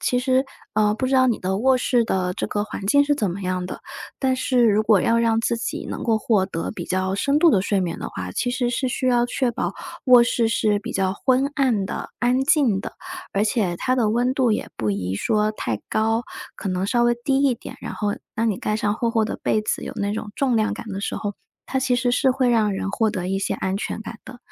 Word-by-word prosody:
其 250 - +1
实， 260 +1 +2 0.3
呃， 210 -1 +3
不 260 - -1
知 270 - 0
道 260 -1 +5
你 230 - +1
的 190 +1 -1
卧 255 +4 +3
室 240 -1 +2
的 180 -3 -1
这 - - -3
个 205 0 -1
环 205 - -7
境 285 +8 +4
是 290 - +2
怎 210 -10 -1
么 195 +3 -6
样 185 0 -2
的， 180 - -7 0.4
但 260 -1 +1
是 255 -1 +2
如 215 0 +3
果 215 -3 +4
要 230 +4 +2
让 230 -1 +2
自 235 +1 0
己 - - -4
能 - - -5
够 225 -2 +2
获 210 -3 +2
得 180 0 -4
比 175 -5 -6
较 185 +1 -1
深 280 +8 +1
度 335 +2 +6
的 195 -10 +3
睡 200 -1 0
眠 175 -2 -2
的 - - -4
话， 90 -1 -6
其 245 - -1
实 245 0 0
是 260 +2 -1
需 255 +1 -2
要 240 -1 +3
确 245 0 -1
保 235 - -2 0.3
卧 245 -2 +8
室 235 -1 +1
是 210 -2 +1
比 - - -6
较 190 -1 0
昏 260 +6 +2
暗 240 -9 +1
的、 - - -5
安 250 +2 +2
静 270 - +3
的， - - -7 0.4
而 200 +2 +1
且 205 -5 0
它 255 +7 0
的 225 -4 +2
温 245 +3 +1
度 255 -5 +2
也 215 - -1
不 105 -2 -1
宜 95 -2 -2
说 215 - +1
太 115 - -3
高， 225 +2 +1 0.3
可 195 - -4
能 185 +1 -1
稍 240 +3 +2
微 240 - +3
低 270 0 +2
一 260 -3 +3
点。 - - -10
然 - - -6
后 210 - -2 0.3
当 225 0 +1
你 195 - -3
盖 210 - -1
上 210 -1 0
厚 235 0 -1
厚 225 -2 +2
的 - - -4
被 215 - +1
子， - - -2
有 - - -6
那 200 0 -1
种 210 -1 -5
重 255 -4 +1
量 215 0 +1
感 230 - -8
的 195 -1 -4
时 - - -3
候， 205 -2 -4 0.3
它 265 - -1
其 255 -1 +1
实 245 0 +1
是 260 +1 +3
会 255 -1 +1
让 220 -4 +3
人 195 0 -3
获 220 0 +1
得 180 -2 -3
一 195 - 0
些 195 - -1
安 190 0 -2
全 210 - -4
感 220 +1 -8
的。 250 - -11
225 Hz, 275 characters per minute, -23 LUFS, 200-250 Hz, 0.4 s, 卧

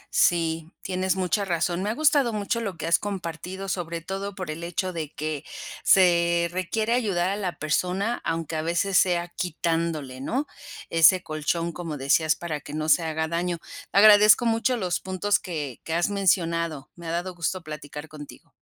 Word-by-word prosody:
Sí, 165 -1 +2
tienes 185 0 0
mucha 190 +2 0
razón. 175 -1 -1
Me 205 - -1
ha 220 - -1
gustado 285 -5 +3
mucho 210 +2 -1
lo 195 -6 -4
que 160 - -5
has 165 +1 +3
compartido, 190 -1 -5
sobre 170 -3 -3
todo 195 +3 -5
por 185 -5 -5
el 160 +2 -7
hecho 180 +2 -2
de 155 -3 -4
que 155 -1 -4 0.4
se 170 -2 +4
requiere 215 +6 -1
ayudar 195 -7 +1
a - - -1
la 190 -4 -3
persona 185 +8 -1
aunque 165 -1 -2
a 155 - -1
veces 175 +4 0
sea 175 -1 +3
quitándole, 165 -6 -2
¿no?, 260 - -1 0.5
ese 165 +3 +6
colchón, 160 +2 -2
como 165 -3 -5
decías, 150 +4 +2
para 155 -4 -5
que 145 - -8
no 155 0 -2
se 170 - +5
haga 160 -1 -2
daño. 170 +1 -1 0.3
Agradezco 210 +3 +7
mucho 230 +2 +1
los 180 -5 -1
puntos 190 +2 0
que 150 -8 -5
que 165 - -3
has 175 +3 +1
mencionado. 170 -6 0
Me 170 -1 -10
ha 165 - -2
dado 175 +2 -2
gusto 175 +1 -3
platicar 150 -1 -8
contigo. 150 -2 -12
175 Hz, 175 wpm, -25 LUFS, 160-190 Hz, 0.5 s, Agradezco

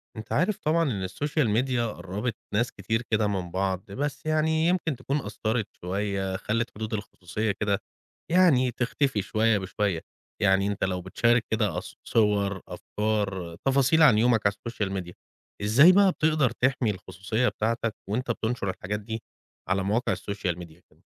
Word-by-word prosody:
أنت 110 - -9
عارف 185 +6 +2
طبعًا 165 +2 +1
إن 95 -4 -2
الSocial 145 - 0
Media 130 -1 0 0.2
قربت 95 +7 -4 0.2
ناس 120 +4 +1
كتير 110 +3 -2
كده 110 -1 +3
من 95 -4 -3
بعض، 95 +1 -2
بس 140 +5 -3
يعني 160 +1 +2
يمكن 175 -4 +1
تكون 130 +3 -2
أثرت 110 +1 -2
شوية، 95 +1 -2
خلت 115 +4 -1
حدود 110 +1 -5
الخصوصية 105 0 -3
كده 100 0 -1 0.5
يعني 155 -9 +5
تختفي 125 0 0
شوية 110 +2 +2
بشوية، 95 -2 -1 0.4
يعني 95 -1 +3
أنت 100 -1 -2
لو 90 -1 -1
بتشارك 115 +6 +2
كده 105 -6 +1
أص - - -6
صور، 100 -3 +1
أفكار، 100 -5 -2
تفاصيل 140 +4 +4
عن 125 -8 +7
يومك 115 +1 +4
على 100 - +4
الSocial 100 -3 -3
Media، 85 0 -11 0.5
إزاي 120 - +7
بقى 195 0 +5
بتقدر 155 -5 +2
تحمي 125 -1 +1
الخصوصية 95 +5 -2
بتاعتَك 115 0 -1
وأنت 120 +3 -1
بتنشر 110 -3 -2
الحاجات 95 +2 -3
دي 110 +2 -6 0.5
على 95 0 +1
مواقع 105 +5 +1
الSocial 100 -4 -3
Media 85 -2 -11
كده؟ - - -28
110 Hz, 155 wpm, -27 LUFS, 100-125 Hz, 0.5 s, عن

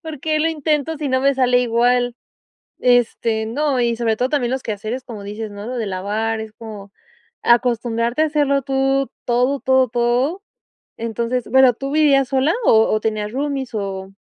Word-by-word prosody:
¿Por 315 -3 -7
qué 310 0 0
lo 320 +2 +2
intento 305 0 -1
si 290 -1 -3
no 260 0 +1
me 275 0 +3
sale 250 -1 +3
igual?". 245 +1 +1 0.7
Este 235 -2 +2
no, 275 +3 0
y 235 -1 +1
sobre 225 -2 0
todo 250 +3 0
también 260 -4 0
los 260 0 -2
quehaceres 220 +4 -4
como 225 -5 -9
dices, 210 +2 -6
¿no? 205 +1 -8
Lo 250 +1 -4
de 225 - -2
lavar, 210 +4 -2
es 220 -1 -8
como 210 -3 -10 0.5
acostumbrarte 235 +2 +1
a 315 - +3
hacerlo 285 -2 +1
tú, 270 0 0
todo, 250 +3 +1
todo, 260 -1 +3
todo. 245 - 0 0.5
Entonces, 230 +2 -3
bueno, 260 0 +6
¿tú 275 +4 -5
vivías 280 -4 +3
sola, 270 +4 +2
o 220 - +4
o 215 - +1
tenías 215 -1 -2
roomies 275 -2 -3
o? 195 -2 -4
245 Hz, 175 wpm, -20 LUFS, 225-275 Hz, 0.7 s, bueno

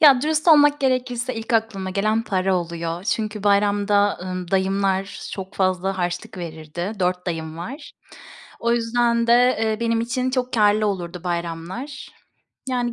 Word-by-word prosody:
Ya, 275 -5 +7
dürüst 310 +2 +1
olmak 290 -2 +6
gerekirse 255 -1 0
ilk 225 +2 -5
aklıma 220 -4 0
gelen 215 +4 +1
para 190 -2 +1
oluyor 170 0 -4
çünkü 215 -1 -2
bayramda, 205 0 +3
ımm, 185 -1 -5
dayımlar 195 0 0
çok 190 -1 -7
fazla 190 0 0
harçlık 175 +1 -3
verirdi. 165 +3 -5
4 180 0 0
dayım 160 -2 -4
var. 270 - -7 0.7
O 235 0 +1
yüzden 235 0 +1
de, 235 - +5 0.3
eee, 220 -1 0
benim 230 -1 +1
için 250 +2 -1
çok 255 -1 -1
kârlı 215 -1 +3
olurdu 180 -3 -4
bayramlar. 175 - -4 0.6
Yani 245 -2 -1
205 Hz, 145 wpm, -22 LUFS, 185-235 Hz, 0.7 s, Ya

